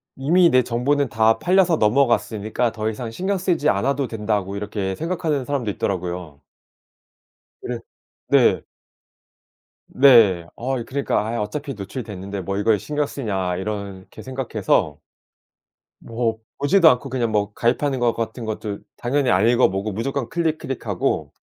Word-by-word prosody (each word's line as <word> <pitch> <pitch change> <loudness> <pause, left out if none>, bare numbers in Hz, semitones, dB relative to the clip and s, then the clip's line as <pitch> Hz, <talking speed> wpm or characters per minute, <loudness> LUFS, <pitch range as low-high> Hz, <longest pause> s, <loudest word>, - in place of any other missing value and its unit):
이미 170 +6 +4
내 130 -3 +5
정보는 135 +4 0
다 110 0 +3
팔려서 180 -2 +3
넘어갔으니까 115 -1 +1
더 110 0 -2
이상 110 +1 -5
신경 190 - -1
쓰지 175 -5 0
않아도 135 +6 0
된다고 105 -3 -2
이렇게 100 -2 -3
생각하는 160 - -2
사람도 125 -5 -2
있더라고요. 90 -6 -4 1.2
그른 125 -1 -4 0.5
네. - - +4 1.3
네. 115 -11 +5
아 130 +2 -2
이 115 - -6
그러니까 140 +1 -1
아 115 +1 -2
어차피 140 +7 -4
노출이 105 +5 -6
됐는데 100 -2 -6
뭐 95 +2 -3
이거에 105 +1 +3
신경 145 +9 -2
쓰냐 95 -10 -3
이렇게 100 -1 -6
생각해서 130 -6 -1 1.0
뭐 115 -1 -2 0.2
보지도 165 +4 +5
않고 125 0 0
그냥 120 -3 -1
뭐 105 -1 0
가입하는 130 +4 0
거 120 -1 +2
같은 115 +1 -4
것도 105 -1 -4 0.2
당연히 130 +2 0
안 100 +3 +3
읽어보고 110 -4 +2
무조건 120 +4 -3
클릭 165 -2 0
클릭하고 115 - -2
115 Hz, 320 characters per minute, -22 LUFS, 105-140 Hz, 1.3 s, 내